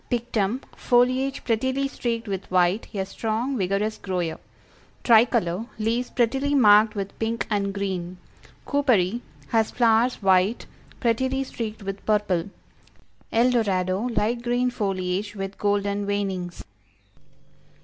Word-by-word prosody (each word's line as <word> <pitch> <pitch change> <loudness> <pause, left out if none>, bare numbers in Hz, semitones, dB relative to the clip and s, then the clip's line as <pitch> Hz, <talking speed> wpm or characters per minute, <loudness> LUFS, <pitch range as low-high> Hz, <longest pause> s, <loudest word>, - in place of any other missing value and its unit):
Pictum, 240 -1 -1
foliage 255 +2 +2
prettily 260 +4 0
streaked 235 -4 -3
with 195 -2 -4
white, 185 +3 +2
a 195 -2 -2
strong, 225 +7 -2
vigorous 205 +1 -1
grower; 180 -4 -3 0.6
Tricolor, 225 -4 +3
leaves 230 +3 -1
prettily 270 +4 +1
marked 215 -3 +6
with 200 -1 -5
pink 225 +1 -1
and 200 -1 0
green; 185 -3 -4 0.5
Cooperi, 240 -7 +2 0.3
has 225 -1 +2
flowers 235 +1 +3
white, 190 +3 +2 0.3
prettily 260 +3 +1
streaked 225 -5 -6
with 195 0 -5
purple; 205 -4 0 0.8
El 240 +3 +3
Dorado, 195 -1 0
light 235 +1 0
green 245 +1 0
foliage, 195 -1 -2
with 195 0 -6
golden 205 0 0
veinings. 190 -3 -3
215 Hz, 115 wpm, -24 LUFS, 195-240 Hz, 0.8 s, marked